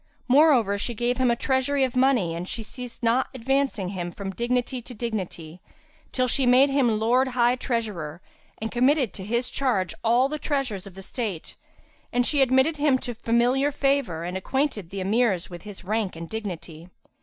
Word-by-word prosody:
Moreover, 255 -7 +4
she 240 +3 -2
gave 240 +3 -1
him 255 -1 +3
a 235 - +3
treasury 265 +3 +1
of 255 -1 -1
money 255 -10 +3
and 170 +2 -5
she 225 - -4
ceased 250 +2 -9
not 235 +3 +2
advancing 260 -6 0
him 175 -2 -4
from 195 +1 -6
dignity 245 +4 -1
to 245 +1 -11
dignity, 185 -7 -5 0.5
till 255 -1 +1
she 260 +1 +1
made 260 +3 +6
him 245 -6 +2
Lord 245 +4 +3
High 245 -1 +2
Treasurer 210 - -3 0.4
and 220 +1 -4
committed 255 - +2
to 190 - -7
his 235 +5 -1
charge 225 -10 0
all 240 +3 +4
the 305 +2 -4
treasures 255 - -2
of 190 - -13
the 195 - -10
state; 200 -6 -5 0.6
and 245 0 +2
she 285 +1 +2
admitted 265 +4 +3
him 290 -2 +3
to 250 -1 -6
familiar 240 +5 +2
favour 275 - 0
and 180 +2 -4
acquainted 215 - -1
the 195 +1 -5
Emirs 195 -3 +1
with 175 -1 -8
his 205 -1 -10
rank 210 -1 -1
and 165 0 -7
dignity. 175 -6 -7
235 Hz, 180 wpm, -25 LUFS, 195-260 Hz, 0.6 s, made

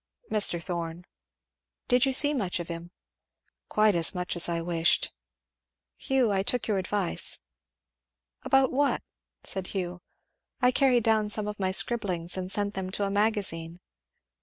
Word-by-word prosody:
"Mr. 205 -5 +4
Thorn." 170 0 -5 0.8
"Did 250 +1 +3
you - - +1
see 290 +3 +4
much 195 -10 -2
of 175 - -7
him?" 170 0 -7 0.8
"Quite 215 0 +3
as 170 +2 +2
much 180 0 -3
as 175 0 +3
I 170 -1 -1
wished. 165 0 +1 0.8
Hugh 260 -5 0
I 195 -1 +1
took 245 +5 -1
your 205 -3 0
advice." 190 -1 0 1.0
"About 270 -1 +2
what?" 280 +2 0 0.4
said 190 -1 -2
Hugh. 180 -2 -5 0.6
"I 250 -1 +3
carried 255 -3 +2
down 220 -1 +2
some 210 0 +4
of 210 0 -6
my 190 -1 0
scribblings 185 -4 +2
and 185 0 -3
sent 205 0 0
them 190 -1 -4
to 205 - -2
a 195 - -3
Magazine." 195 -6 -1
195 Hz, 150 wpm, -27 LUFS, 175-220 Hz, 1.0 s, Mr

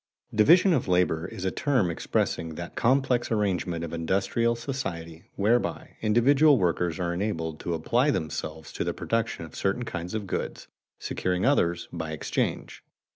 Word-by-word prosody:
_Division 170 - +6
of 130 - -1
labor 90 -2 +2
is 95 0 -7
a 95 - +1
term 125 -12 +1
expressing 80 0 -1
that 85 +1 -7
complex 125 -1 +2
arrangement 95 -6 0
of 85 - -5
industrial 95 +8 +1
society 90 - -5
whereby 115 +5 0
individual 135 +7 +5
workers 90 -2 0
are 85 -1 -1
enabled 85 -5 -2
to 85 - -2
apply 120 - +2
themselves 80 - -3
to - - -2
the - - -2
production - - -2
of - - -14
certain 100 +6 -1
kinds 85 -1 -5
of 105 -2 -3
goods, - - -4 0.3
securing 90 0 -1
others 85 -11 +2
by 80 -2 -4
exchange. 80 - -3
95 Hz, 150 wpm, -27 LUFS, 85-120 Hz, 0.3 s, Division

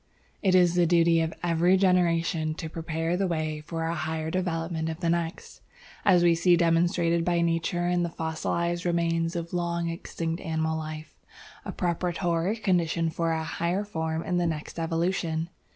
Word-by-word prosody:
"It 190 -2 +3
is 175 -2 +5
the 175 -1 +3
duty 165 -1 +4
of 160 0 -1
every 175 +2 +3
generation 170 -4 +2
to 160 - -5
prepare 165 +1 -2
the 190 +1 0
way 155 -3 -2
for 165 -1 -3
a 165 - -1
higher 160 0 -3
development 165 -3 -2
of 160 0 -5
the 170 -2 +1
next, 170 +1 -3 0.4
as 180 -3 +5
we 170 -1 +5
see 175 +1 +4
demonstrated 170 0 +2
by 175 0 +1
Nature 170 +1 0
in 175 0 +1
the 170 - 0
fossilized 170 +2 -2
remains 165 -1 0
of 170 0 -4
long 170 -1 -1
extinct 165 0 -4
animal 160 0 -1
life, 155 -1 -6 0.5
a - - -4
preparatory 175 +2 -1
condition 170 -5 +1
for 165 +1 -1
a 160 0 -1
higher 175 +5 -1
form 160 -4 -3
in 180 - -1
the 175 -1 +1
next 160 +1 -4
evolution. 165 0 -1
170 Hz, 170 wpm, -27 LUFS, 160-175 Hz, 0.5 s, is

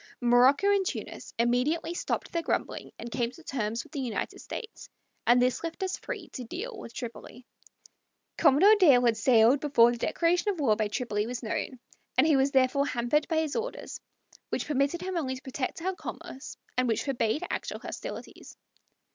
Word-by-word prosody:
Morocco 250 +7 +5
and 400 -1 +3
Tunis 375 - -5
immediately 250 +9 +1
stopped - - -3
their 335 - -1
grumbling - - -2
and 235 - -7
came 235 -1 0
to 335 +7 -15
terms 230 -4 -2
with - - -19
the 290 - -3
United 235 -6 -3
States, 450 -2 -8 0.4
and 245 +1 +6
this 250 +3 +1
left 335 +4 -4
us 380 0 -1
free 415 -9 -6
to 255 - -7
deal 405 - -6
with 315 - -9
Tripoli. 240 +1 -8 0.9
Commodore 330 +7 +6
Dale 270 -10 +6
had 230 -1 +4
sailed 230 +3 +5
before 240 -6 +5
the 240 - -5
declaration 345 - +1
of 365 - -6
war 240 -8 +3
by 215 -1 0
Tripoli 210 -1 -2
was 245 +1 -5
known, 240 +3 -3 0.4
and - - +6
he 310 -2 +4
was 270 +1 +3
therefore 270 +1 +2
hampered 250 +4 +1
by 325 - 0
his 310 -2 -3
orders, 465 +2 -4 0.5
which - - -2
permitted 290 +4 0
him 375 0 -3
only 260 -5 -1
to 260 - -10
protect 265 +4 -4
our 375 +1 0
commerce, 270 -6 -8 0.2
and 255 0 +2
which 225 - 0
forbade 250 -1 0
actual - - -3
hostilities. - - -8
265 Hz, 180 wpm, -28 LUFS, 240-335 Hz, 0.9 s, and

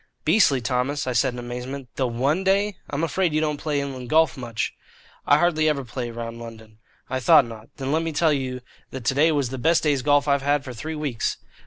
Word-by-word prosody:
"Beastly, 140 - +4
Thomas?" 130 +4 -1
I 130 - -1
said 125 +2 +2
in - - -8
amazement. 125 +2 -6
"The 130 - 0
one 135 +10 0
day? 200 +1 +2
I'm 145 +3 -2
afraid 165 +1 0
you - - +3
don't 150 -1 -1
play 150 -2 -1
inland 130 -3 -5
golf 160 0 +4
much?" 120 -4 -3 0.5
"I 145 - +6
hardly 155 -1 +2
ever 140 -3 -1
play 120 +1 -5
round 115 0 -6
London." 110 -2 -11 0.3
"I 130 - -2
thought 145 +1 +6
not. 115 -1 -11
Then 135 0 -3
let 160 +2 +2
me 165 0 -2
tell 155 +1 +2
you 130 -2 -3 0.3
that 130 -3 -8
today's 150 +5 +3
was 140 -4 0
the 130 - -5
best 165 +5 +3
day's 145 -4 +2
golf 145 +1 +3
I've 140 -1 +2
had 145 0 +1
for 130 -3 -7
three 155 +7 -5
weeks." 140 -8 -2
140 Hz, 220 wpm, -24 LUFS, 125-155 Hz, 0.5 s, I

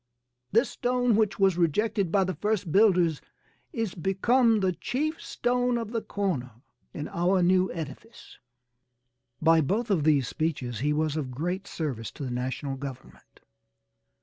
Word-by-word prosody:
This 235 +4 +3
stone 245 -2 +1
which 215 -2 +1
was 190 -3 +3
rejected 195 +2 +1
by 195 0 +3
the 185 0 -2
first 205 -5 -1
builders 180 -6 +4 0.5
'is 225 -5 -2
become 220 +6 +2
the 190 -1 +2
chief 295 - -3
stone 245 0 0
of 225 -2 -4
the 230 -2 -1
corner' 175 - -3 0.4
in 150 - -5
our 180 +2 +1
new 185 +1 +3
edifice." 165 - -9 1.0
By 165 0 +5
both 210 - -1
of 170 -7 +2
these 145 -5 +3
speeches 135 -8 -2
he 145 +4 0
was 155 0 0
of 145 -5 -3
great 175 +9 -3
service 130 -9 -4
to - - -7
the 130 - -4
national 130 +2 -3
government. 135 -1 -10
180 Hz, 150 wpm, -27 LUFS, 150-220 Hz, 1.0 s, By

